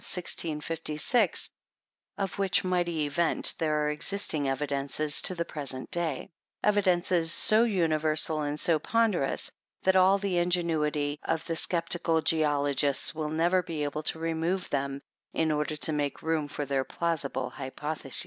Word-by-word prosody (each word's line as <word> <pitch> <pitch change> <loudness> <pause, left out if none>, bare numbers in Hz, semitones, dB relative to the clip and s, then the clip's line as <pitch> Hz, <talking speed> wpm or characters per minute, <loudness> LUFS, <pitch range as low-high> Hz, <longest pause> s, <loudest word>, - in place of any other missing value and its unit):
1656, 165 +4 0 0.7
of 195 -3 -4
which 195 0 +2
mighty 175 -4 0
event 165 +3 +2
there 150 -2 0
are 150 - 0
existing 150 -3 +1
evidences 140 +1 0
to 185 - +1
the 170 -1 -2
present 135 -5 -5
day; 165 -5 -1 0.4
evidences, 180 -5 +2
so 215 +6 +5
universal 155 -6 +1
and 145 0 -3
so 160 -1 +2
ponderous, 210 -7 0 0.3
that 190 0 +3
all 190 +1 +5
the 195 -3 -1
ingenuity 155 -4 0
of 160 -1 -2
the 165 - -3
sceptical 165 -1 +1
geologists 145 -3 +2
will 155 -1 -4
never 170 +4 +2
be 165 -4 -5
able 145 +1 -3
to 155 - 0
remove 165 +3 -2
them 140 -1 -2 0.3
in 160 -1 0
order 150 0 -1
to 155 +1 +1
make 145 -2 -3
room 160 -2 -1
for 145 0 -5
their 135 -1 -1
plausible 140 -4 -2
hypotheses. 140 0 -2
160 Hz, 140 wpm, -28 LUFS, 150-175 Hz, 0.7 s, so